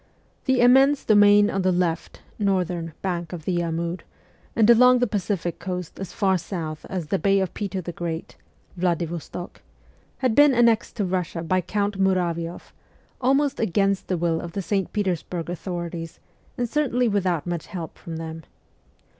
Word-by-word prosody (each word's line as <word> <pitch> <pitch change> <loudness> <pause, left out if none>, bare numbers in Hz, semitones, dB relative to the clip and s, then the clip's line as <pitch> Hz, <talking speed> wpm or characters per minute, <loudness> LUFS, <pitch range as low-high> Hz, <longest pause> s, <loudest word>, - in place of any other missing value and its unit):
The 260 -2 +3
immense 270 +3 +5
domain 205 -1 +6
on 195 - -1
the 185 0 +2
left 175 -2 -2 0.2
(northern) 180 -5 0
bank 175 -3 -3
of 165 -3 -7
the 175 -2 0
Amur, 170 +1 -2 0.6
and 220 -2 +4
along 250 +2 +7
the 245 - +2
Pacific 190 -5 -2
Coast 180 -2 -5
as 190 -2 -5
far 190 -3 +1
south 160 -3 -5
as 180 -4 -3
the 195 - +1
Bay 195 -1 +3
of 190 -2 -2
Peter 195 -2 -3
the 175 - -5
Great 165 -1 -5 0.4
(Vladivostok), 175 -1 -3 0.6
had 255 -4 +1
been 290 +1 +6
annexed 235 -2 +3
to 210 - -1
Bussia 180 -2 -2
by 185 +1 +2
Count 200 +2 -2
Muravioff, 175 -3 -1 0.5
almost 275 +2 +2
against 195 -1 +1
the 185 - 0
will 165 -1 0
of 170 -1 -7
the 195 - -3
St. 195 0 -1
Petersburg 180 -4 -2
authorities 170 -2 -5 0.4
and 245 - 0
certainly 250 -2 +1
without 185 -6 0
much 175 -2 -4
help 170 -4 -6
from 165 -1 -7
them. 160 0 -6
185 Hz, 160 wpm, -24 LUFS, 170-205 Hz, 0.6 s, along